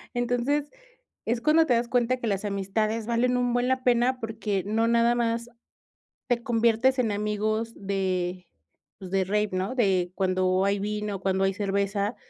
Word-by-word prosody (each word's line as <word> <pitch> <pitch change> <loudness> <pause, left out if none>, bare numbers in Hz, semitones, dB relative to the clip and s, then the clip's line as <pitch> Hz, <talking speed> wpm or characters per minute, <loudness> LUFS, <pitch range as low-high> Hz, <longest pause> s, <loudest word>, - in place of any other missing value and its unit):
Entonces, 245 +5 0 0.5
es 235 +1 0
cuando 315 +4 +4
te 245 - +3
das 235 +1 0
cuenta 245 +1 +1
que 245 - -6
las 200 0 -1
amistades 210 +3 -1
valen 245 +2 +1
un 245 -1 0
buen 245 +1 +1
la 260 0 0
pena, 250 +1 +2
porque, 220 -4 -3
no 225 +2 +1
nada 235 0 +3
más 235 0 -1 0.8
te 240 -1 +1
conviertes 235 +2 +2
en 225 -4 +1
amigos 210 +2 -1
de, 185 -2 -2 0.5
pues 185 -2 -9
de 195 -1 +1
rave, 210 +2 0
¿no? 190 +6 -2
De 185 -7 +1
cuando 185 0 +1
hay 200 0 +1
vino, 210 0 -3
cuando 190 0 0
hay 195 - +2
cerveza, 200 +1 -1
215 Hz, 165 wpm, -26 LUFS, 195-240 Hz, 0.8 s, cuando